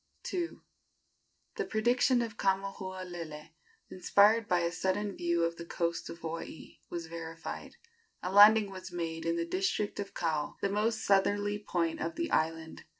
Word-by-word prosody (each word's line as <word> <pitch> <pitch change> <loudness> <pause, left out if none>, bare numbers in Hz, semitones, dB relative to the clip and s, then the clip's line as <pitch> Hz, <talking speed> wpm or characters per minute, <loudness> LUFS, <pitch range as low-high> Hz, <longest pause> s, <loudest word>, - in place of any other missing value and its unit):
II. 350 -2 -2 1.0
The - - -1
prediction 240 +2 +2
of 225 -3 -6
Kamahualele, 185 -5 -3 0.4
inspired 205 +4 +4
by 180 -1 +2
a 170 0 0
sudden 195 +3 -1
view 170 -1 +1
of 170 0 -1
the 170 - -6
coast 170 0 -2
of 165 - -7
Hawaii, 165 0 -7
was 170 -1 -4
verified. 165 0 -7 0.5
A 180 - -2
landing 205 +1 +8
was 185 -1 -8
made 165 -1 -3
in 165 - +1
the 170 0 -1
district 190 +4 -1
of 200 -1 -5
Kau, 155 -3 -1
the 200 - 0
most 215 +3 0
southerly 205 +1 +2
point 170 -5 -1
of 165 +1 -2
the 335 - -2
island. 160 0 -1
185 Hz, 150 wpm, -31 LUFS, 170-205 Hz, 1.0 s, landing